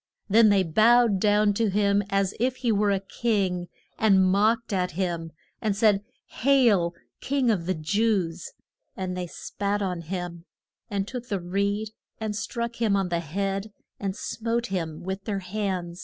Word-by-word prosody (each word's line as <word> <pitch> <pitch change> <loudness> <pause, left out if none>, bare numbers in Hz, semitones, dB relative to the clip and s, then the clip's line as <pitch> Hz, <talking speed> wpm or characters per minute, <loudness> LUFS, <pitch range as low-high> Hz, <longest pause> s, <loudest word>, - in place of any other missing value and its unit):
Then 215 +2 +6
they 200 -2 +4
bowed 220 +4 +4
down 210 0 +3
to 220 +1 +1
him, 200 0 +2
as 195 -1 +1
if 255 +2 +1
he 245 -3 0
were 205 0 +2
a 200 -1 +2
king, 195 -4 -1 0.3
and 195 -4 +5
mocked 215 +4 +2
at 180 -1 0
him 170 -2 -2 0.3
and 215 -3 0
said, 205 -1 +3 0.4
Hail, 225 -10 +4 0.2
King 265 -3 +1
of 180 -5 -1
the 185 - +1
Jews! 180 0 0 0.5
And 185 -1 -3
they 180 -1 -3
spat 205 +4 -3
on 180 -3 -2
him, 175 0 -5 0.4
and 200 -1 -2
took 245 -1 -6
the 200 -5 -1
reed 200 +4 -1 0.3
and 215 -1 -3
struck 235 +2 -3
him 220 -3 +2
on 195 -2 0
the 170 -1 0
head, 195 +5 -3 0.3
and 195 -1 -3
smote 230 +1 -2
him 165 -4 -3
with 190 +1 -5
their 205 -3 -1
hands. 185 -3 -3
200 Hz, 165 wpm, -26 LUFS, 180-220 Hz, 0.5 s, Then